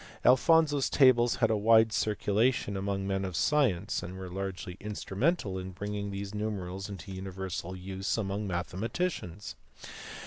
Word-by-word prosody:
Alphonso 145 +4 +5
s 135 - +1
tables 120 -4 +5
had 115 -3 +2
a - - +3
wide 110 +1 +5
circulation 105 +1 +1
among 95 0 -2
men 95 0 -1
of 95 -2 -4
science 110 - +1
and 90 +2 -7
were 95 -1 -7
largely 95 -1 -5
instrumental 105 - -1
in 95 0 -7
bringing 100 +2 -4
these 100 0 -5
numerals 100 -2 -4
into 95 -1 -8
universal 95 -1 -5
use 95 +2 -3
among 100 -1 -2
mathematicians. 95 - -3
100 Hz, 140 wpm, -30 LUFS, 95-110 Hz, -, Alphonso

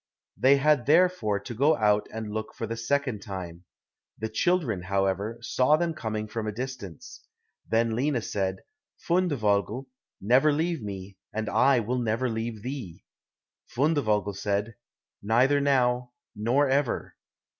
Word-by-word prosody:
They 135 +2 +5
had 140 -3 +2
therefore 155 - +3
to 110 - -7
go 140 +7 +3
out 105 -1 +2
and 110 -1 -5
look 110 0 -5
for 115 - -3
the 115 +1 -4
second 130 0 -1
time. 90 -3 -7 0.5
The 110 +1 -3
children, 130 - +1
however, 95 +4 -1
saw 130 +5 +3
them 170 0 -1
coming 110 -6 -4
from 110 0 -4
a - - -1
distance. 110 - -7 0.5
Then 115 0 +2
Lina 130 -1 0
said, 95 -2 -2 0.4
"Fundevogel, 125 - +1 0.3
never 130 +9 +4
leave 160 0 -1
me, 100 -2 -7
and 110 0 -3
I 130 +1 +4
will 125 +4 -1
never 120 +2 0
leave 110 -1 -4
thee." 125 -10 -6 0.6
Fundevogel 110 - +1
said, 100 +3 -1 0.5
"Neither 125 +7 +3
now, 125 -3 +1 0.2
nor 120 +7 +2
ever." 135 -1 0
115 Hz, 135 wpm, -27 LUFS, 105-135 Hz, 0.6 s, They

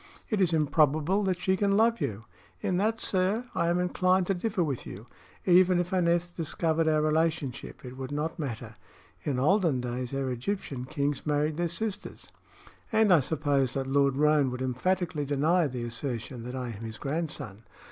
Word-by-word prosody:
"It 210 -3 +1
is 180 -3 +3
improbable 155 +4 +2
that 185 -2 0
she 190 +1 +1
can 200 +1 +2
love 230 +1 +3
you." 110 +1 -3 0.4
"In 180 - -1
that, 220 +4 +1
sir, 195 +6 +1
I 170 - 0
am 170 +1 +2
inclined 185 +1 +2
to 195 - +1
differ 195 0 -1
with 140 -6 -2
you. 100 +4 -9 0.4
Even 180 0 +5
if 175 +1 -2
Aneth 175 -1 +1
discovered 165 0 0
our 155 -1 +3
relationship, 155 -5 -1
it 125 +1 -9
would 130 +1 -6
not 155 +4 -3
matter. 120 -6 -5 0.5
In 140 -4 -2
olden 160 0 +3
days 125 0 -4
our 135 -1 -2
Egyptian 130 - -3
kings 145 +1 -2
married 150 +1 +1
their 175 0 +1
sisters. 205 +4 -4 0.6
And 220 -3 +5
I 170 - +7
suppose 140 -3 0
that 135 -1 -1
Lord 140 0 +2
Roane 150 -1 +3
would 125 +1 -4
emphatically 165 +5 -1
deny 150 +4 +2
the 125 -3 -5
assertion 120 0 -4
that 125 +1 -5
I 125 -2 -4
am 110 -2 -8
his 110 -1 -6
grandson. 140 - -3
155 Hz, 175 wpm, -28 LUFS, 130-180 Hz, 0.6 s, I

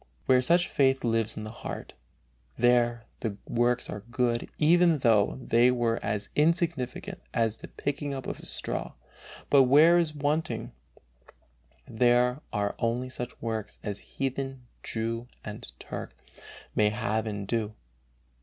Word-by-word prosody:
Where 130 -1 +5
such 170 +6 +3
faith 135 -1 +2
lives 115 -2 0
in 110 - -4
the 110 - -6
heart, 120 - -7 0.6
there 120 -1 +3
the 105 -4 -3
works 120 +1 +1
are - - -5
good 120 -1 0
"even 170 +1 +5
though 115 -5 +3
they 120 -1 +4
were 120 -2 +1
as 105 -1 -2
insignificant 160 -5 0
as 115 -1 +1
the - - -10
picking 145 0 -3
up 135 -2 -5
of - - -5
a - - -10
straw"; - - -3 0.6
but 135 -2 +7
where 155 +7 +6
it - - +5
is 155 -3 -2
wanting, 150 +2 -1 1.2
there 125 +3 +3
are 100 0 0
only 120 +2 -1
such 125 -1 -6
works 110 -2 -3
as 100 -1 -1
"heathen, 135 -1 -4 0.2
Jew 115 +1 -3 0.2
and - - -7
Turk" - - -7 0.6
may 105 -1 +3
have 110 0 -1
and 105 -2 -4
do. 110 -2 -1
120 Hz, 145 wpm, -28 LUFS, 115-135 Hz, 1.2 s, but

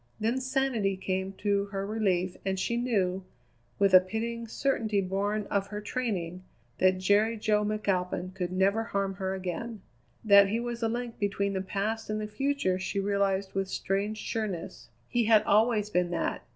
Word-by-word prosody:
Then 230 +4 0
sanity 255 -7 0
came 190 0 -2
to 200 0 0
her 195 -1 -4
relief 190 -4 0
and 190 -1 -1
she 235 +5 0
knew, 195 -6 0 0.5
with 200 -1 +3
a 185 - +11
pitying 230 +5 -4
certainty 225 -4 0
born 200 +2 -1
of 200 -1 +1
her 210 +1 -5
training, 200 -7 -3 0.4
that 185 0 +4
Jerry 205 +4 +2
Jo 210 0 +2
McAlpin 190 -3 -1
could 180 -2 -3
never 195 +4 +2
harm 195 -3 -1
her 190 -1 -2
again. 190 +3 -5 0.4
That 200 -1 +8
he 220 +4 0
was 240 0 -4
a 225 - +1
link 240 0 -4
between 200 0 0
the 190 - -1
past 210 +4 -3
and 215 0 -1
the 215 - -3
future 210 -3 0
she 195 +1 -2
realized 195 -1 0
with 195 0 -1
strange 200 +3 -2
sureness. 180 - -4 0.2
He 240 -2 +1
had 215 -1 +5
always 210 0 +3
been 180 -2 +1
that. 175 - -2
200 Hz, 170 wpm, -29 LUFS, 190-220 Hz, 0.5 s, a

